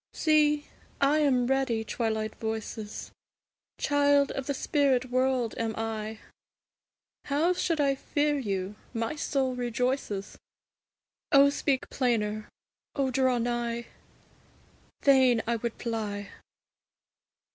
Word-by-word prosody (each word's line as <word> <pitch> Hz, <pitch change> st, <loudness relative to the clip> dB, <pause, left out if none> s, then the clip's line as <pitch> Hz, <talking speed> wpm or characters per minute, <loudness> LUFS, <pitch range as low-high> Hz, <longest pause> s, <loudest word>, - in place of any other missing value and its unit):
See, 300 Hz, -2 st, +3 dB, 0.3 s
I 280 Hz, +2 st, +3 dB
am 260 Hz, -5 st, +3 dB
ready, 260 Hz, -3 st, +1 dB
Twilight 220 Hz, -1 st, -2 dB
voices! 220 Hz, -1 st, -5 dB, 0.7 s
Child 285 Hz, -1 st, +3 dB
of 270 Hz, -1 st, -4 dB
the 285 Hz, -, 0 dB
spirit 260 Hz, -4 st, +1 dB
world 255 Hz, -2 st, +1 dB
am 225 Hz, -1 st, -1 dB
I; 220 Hz, -1 st, -3 dB, 1.1 s
How 305 Hz, +6 st, +2 dB
should 335 Hz, -3 st, -1 dB
I 280 Hz, -1 st, +3 dB
fear 290 Hz, +2 st, 0 dB
you? 195 Hz, -5 st, -2 dB, 0.2 s
my 230 Hz, +5 st, -1 dB
soul 270 Hz, -3 st, 0 dB
rejoices, 245 Hz, -4 st, -2 dB, 0.9 s
O 280 Hz, 0 st, +7 dB
speak 280 Hz, -2 st, 0 dB
plainer! 215 Hz, -4 st, 0 dB, 0.5 s
O 270 Hz, -2 st, 0 dB
draw 260 Hz, -1 st, +2 dB
nigh! 235 Hz, 0 st, -2 dB, 1.2 s
Fain 260 Hz, -4 st, +5 dB
would 235 Hz, 0 st, 0 dB, 0.2 s
I -, -, -12 dB
fly! 210 Hz, -4 st, -3 dB
250 Hz, 105 wpm, -28 LUFS, 225-280 Hz, 1.2 s, O